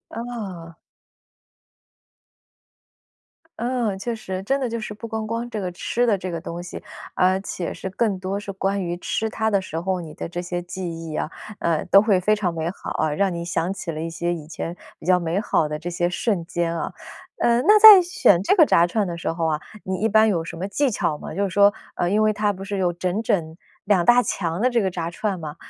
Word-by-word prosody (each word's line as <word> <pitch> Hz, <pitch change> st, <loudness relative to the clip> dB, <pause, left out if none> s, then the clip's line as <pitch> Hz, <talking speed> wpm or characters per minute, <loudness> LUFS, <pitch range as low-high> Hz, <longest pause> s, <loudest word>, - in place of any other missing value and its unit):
哦。 200 Hz, -9 st, -6 dB, 2.8 s
嗯， 235 Hz, -4 st, -1 dB
确 235 Hz, +3 st, -3 dB
实， 190 Hz, -4 st, -5 dB
真 270 Hz, +7 st, 0 dB
的 260 Hz, -, -1 dB
就 230 Hz, 0 st, -3 dB
是 215 Hz, -1 st, -6 dB
不 215 Hz, +2 st, -8 dB
光 220 Hz, -1 st, -4 dB
光 230 Hz, +2 st, -3 dB
这 220 Hz, -, -4 dB
个 180 Hz, -1 st, -3 dB
吃 235 Hz, +7 st, -1 dB
的 210 Hz, -3 st, +3 dB
这 185 Hz, -1 st, -5 dB
个 170 Hz, -, -3 dB
东 170 Hz, 0 st, -6 dB
西， 180 Hz, -, -8 dB, 0.3 s
而 185 Hz, +1 st, +3 dB
且 185 Hz, -3 st, -4 dB
是 190 Hz, -, -6 dB
更 205 Hz, 0 st, 0 dB
多 190 Hz, +2 st, -3 dB
是 205 Hz, -1 st, -6 dB
关 195 Hz, +1 st, -1 dB
于 175 Hz, 0 st, -3 dB
吃 220 Hz, +4 st, -2 dB
它 220 Hz, 0 st, -1 dB
的 200 Hz, -2 st, +2 dB
时 165 Hz, -3 st, -5 dB
候， 185 Hz, +1 st, -1 dB
你 160 Hz, -2 st, -9 dB
的 -, -, -6 dB
这 175 Hz, +1 st, -4 dB
些 175 Hz, 0 st, -4 dB
记 180 Hz, +2 st, -7 dB, 0.3 s
忆 -, -, -5 dB
啊， -, -, -2 dB, 0.3 s
呃， 165 Hz, -2 st, 0 dB
都 195 Hz, -, +6 dB
会 205 Hz, -3 st, +3 dB
非 210 Hz, +4 st, +2 dB
常 190 Hz, -5 st, -1 dB
美 165 Hz, 0 st, -2 dB
好 -, -, -8 dB
啊， 155 Hz, -1 st, 0 dB
让 195 Hz, +3 st, +1 dB
你 170 Hz, 0 st, -4 dB
想 170 Hz, +1 st, -1 dB
起 185 Hz, -3 st, -5 dB
了 155 Hz, 0 st, -5 dB
一 165 Hz, -, -3 dB
些 170 Hz, +1 st, -2 dB
以 155 Hz, -3 st, -7 dB
前 165 Hz, +1 st, -5 dB, 0.2 s
比 -, -, -14 dB
较 180 Hz, 0 st, +4 dB
美 170 Hz, +2 st, -1 dB
好 180 Hz, -7 st, +1 dB
的 150 Hz, 0 st, -4 dB
这 165 Hz, +3 st, -5 dB
些 175 Hz, 0 st, 0 dB
瞬 185 Hz, 0 st, -1 dB
间 170 Hz, 0 st, -2 dB
啊。 165 Hz, -, -3 dB, 0.5 s
呃， 235 Hz, 0 st, +3 dB
那 420 Hz, +5 st, +7 dB
在 420 Hz, -3 st, +11 dB
选 345 Hz, -, +3 dB
这 205 Hz, -, +3 dB
个 330 Hz, -6 st, +7 dB
炸 170 Hz, -10 st, +4 dB
串 210 Hz, +3 st, 0 dB
的 170 Hz, -2 st, -4 dB
时 170 Hz, -, -2 dB
候 165 Hz, 0 st, -2 dB
啊， 155 Hz, -2 st, 0 dB, 0.2 s
你 185 Hz, 0 st, -3 dB
一 215 Hz, +5 st, +1 dB
般 220 Hz, +1 st, +5 dB
有 170 Hz, -5 st, 0 dB
什 165 Hz, -, -7 dB
么 185 Hz, +3 st, -3 dB
技 270 Hz, +8 st, +1 dB
巧 160 Hz, -8 st, -1 dB
吗？ -, -, -8 dB
就 200 Hz, -, 0 dB
是 200 Hz, -, 0 dB
说 200 Hz, +2 st, +5 dB, 0.2 s
呃， 175 Hz, -, 0 dB
因 210 Hz, +3 st, +2 dB
为 215 Hz, -, +4 dB
它 210 Hz, 0 st, 0 dB
不 195 Hz, 0 st, -8 dB
是 200 Hz, 0 st, -4 dB
有 180 Hz, -2 st, +1 dB
整 180 Hz, +4 st, -2 dB
整 170 Hz, -8 st, -1 dB, 0.3 s
2 190 Hz, -4 st, +2 dB
大 245 Hz, +1 st, +6 dB
墙 170 Hz, -3 st, -2 dB
的 250 Hz, -, +3 dB
这 240 Hz, -2 st, +2 dB
个 190 Hz, -, +1 dB
炸 170 Hz, -2 st, -4 dB
串 195 Hz, 0 st, -2 dB
吗， 155 Hz, -2 st, -6 dB
190 Hz, 250 characters per minute, -23 LUFS, 170-215 Hz, 2.8 s, 在